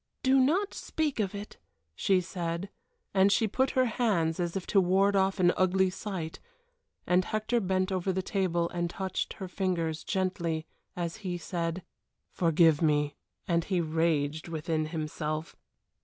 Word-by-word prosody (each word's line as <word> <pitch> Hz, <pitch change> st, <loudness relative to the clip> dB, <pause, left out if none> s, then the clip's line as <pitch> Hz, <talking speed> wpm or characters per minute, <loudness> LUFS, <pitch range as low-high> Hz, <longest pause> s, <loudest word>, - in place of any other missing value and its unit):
"Do 265 Hz, +1 st, +5 dB
not 345 Hz, +10 st, +2 dB
speak 305 Hz, -6 st, -2 dB
of 205 Hz, -1 st, -1 dB
it," 205 Hz, +1 st, -8 dB, 0.4 s
she 185 Hz, -, +2 dB
said, 175 Hz, +1 st, -4 dB, 0.4 s
and 195 Hz, +1 st, +5 dB
she 220 Hz, +2 st, +3 dB
put 260 Hz, +5 st, +1 dB
out -, -, -18 dB
her 255 Hz, -1 st, +4 dB
hands 200 Hz, -9 st, +1 dB
as 175 Hz, 0 st, -1 dB
if 190 Hz, -, -5 dB
to 195 Hz, -, +4 dB
ward 195 Hz, +2 st, +3 dB
off 195 Hz, 0 st, +2 dB
an 180 Hz, -1 st, +5 dB
ugly 185 Hz, 0 st, +3 dB
sight, 185 Hz, -5 st, -5 dB, 0.7 s
and 180 Hz, +1 st, +3 dB
Hector 215 Hz, +3 st, 0 dB
bent 185 Hz, -1 st, 0 dB
over 185 Hz, 0 st, 0 dB
the 190 Hz, 0 st, -1 dB
table 180 Hz, -4 st, 0 dB
and 175 Hz, -1 st, -2 dB
touched 190 Hz, +2 st, -3 dB
her 190 Hz, -, -7 dB
fingers 175 Hz, -4 st, -1 dB
gently 175 Hz, -5 st, -1 dB, 0.3 s
as 170 Hz, 0 st, -3 dB
he 185 Hz, -5 st, -4 dB
said: 170 Hz, 0 st, -3 dB, 0.5 s
"Forgive 165 Hz, -2 st, +4 dB
me," 150 Hz, -2 st, +2 dB, 0.3 s
and 170 Hz, -1 st, +1 dB
he 185 Hz, -3 st, 0 dB
raged 160 Hz, -2 st, 0 dB
within 160 Hz, -1 st, -1 dB
himself. 155 Hz, 0 st, -4 dB
180 Hz, 155 wpm, -29 LUFS, 165-195 Hz, 0.7 s, Do